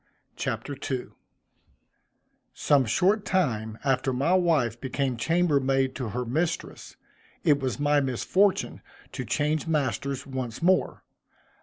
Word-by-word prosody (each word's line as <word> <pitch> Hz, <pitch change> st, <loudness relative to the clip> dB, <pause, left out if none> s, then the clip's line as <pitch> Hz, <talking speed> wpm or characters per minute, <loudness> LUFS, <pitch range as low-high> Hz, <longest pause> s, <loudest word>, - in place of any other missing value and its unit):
CHAPTER 145 Hz, -, -3 dB
II 130 Hz, -2 st, -3 dB, 1.5 s
Some 140 Hz, -3 st, +3 dB
short 190 Hz, -, +2 dB
time 110 Hz, -, -1 dB
after 135 Hz, -1 st, +1 dB
my 140 Hz, +8 st, +1 dB
wife 155 Hz, -, +2 dB
became 130 Hz, -1 st, -1 dB
chambermaid 135 Hz, -2 st, +1 dB
to 125 Hz, -4 st, -3 dB
her 125 Hz, +4 st, -3 dB
mistress, 160 Hz, +8 st, -3 dB, 0.5 s
it 150 Hz, -4 st, +4 dB
was 130 Hz, 0 st, -3 dB
my 145 Hz, 0 st, +3 dB
misfortune 185 Hz, -, +1 dB, 0.3 s
to -, -, -5 dB
change 150 Hz, +2 st, -1 dB
masters 140 Hz, -2 st, -1 dB
once 130 Hz, 0 st, -5 dB
more. 185 Hz, +1 st, +2 dB
140 Hz, 115 wpm, -26 LUFS, 125-160 Hz, 1.5 s, it